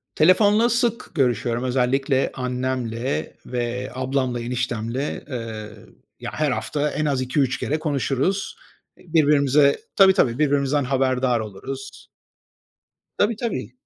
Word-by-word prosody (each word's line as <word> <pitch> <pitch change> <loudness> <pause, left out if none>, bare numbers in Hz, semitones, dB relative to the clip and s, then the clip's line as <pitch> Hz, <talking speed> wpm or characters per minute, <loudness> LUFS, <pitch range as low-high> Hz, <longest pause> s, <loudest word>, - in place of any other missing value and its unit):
Telefonla 205 +7 +5
sık 235 0 0
görüşüyorum, 120 -4 0
özellikle 130 +2 +1
annemle 125 - -3
ve 125 +1 -3
ablamla, 130 -1 -1
eniştemle. 120 +2 -3
Iıı, 110 -5 -7 0.3
ya, - - -5
her 150 -1 +1
hafta 145 +3 -1
en 155 - -2
az 135 -3 0
2-3 130 0 0
kere 155 +2 -1
konuşuruz. 155 - -1 0.4
Birbirimize 145 -4 +3 0.2
tabii 195 -1 +7
,tabii, 125 - +2
birbirimizden 145 -1 +2
haberdar 130 -2 +1
oluruz. 130 +6 -8 1.1
Tabii 210 +2 +2
tabii. 235 +1 -4
135 Hz, 110 wpm, -23 LUFS, 125-150 Hz, 1.1 s, tabii